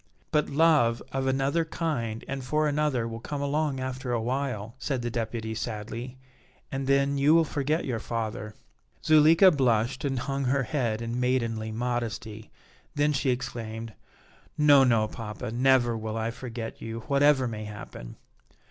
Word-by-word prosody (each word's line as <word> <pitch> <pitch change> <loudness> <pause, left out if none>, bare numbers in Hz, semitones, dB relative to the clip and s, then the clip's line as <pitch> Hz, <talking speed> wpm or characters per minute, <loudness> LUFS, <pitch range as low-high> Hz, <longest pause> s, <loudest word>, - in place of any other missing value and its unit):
"But 150 -1 +2
love 140 -6 +3
of 135 0 -1
another 135 +5 +1
kind 140 -9 -3
and 135 -1 -4
for 150 +4 +1
another 145 -5 0
will 115 0 -6
come 145 +5 -5
along 140 -1 0
after 130 0 -4
awhile," 120 -2 -2
said 130 -2 -2
the 120 - -2
Deputy 115 -1 -3
sadly, 115 +3 -5 0.5
"and 135 0 -3
then 140 0 +2
you 145 +3 +5
will 165 - +6
forget 150 +2 -1
your 120 -4 -2
father." 110 -2 -4 0.5
Zuleika 160 +4 +7
blushed 125 -3 +1
and 135 -2 -1
hung 135 +2 -2
her 135 +2 +2
head 120 -5 -1
in 115 +1 -3
maidenly 115 -3 0
modesty; 115 -2 -3 0.5
then 145 +1 +2
she 135 -1 0
exclaimed: 115 -3 -4 0.6
"No, 145 -2 +7
no, 115 -4 +3
papa; 105 -2 -6
never 120 -1 +3
will 110 0 -4
I 115 +1 -1
forget 120 -2 -7
you 115 +1 -5
whatever 140 +1 +3
may 110 -2 -5
happen!" 105 -12 -9
125 Hz, 150 wpm, -27 LUFS, 115-140 Hz, 0.6 s, Zuleika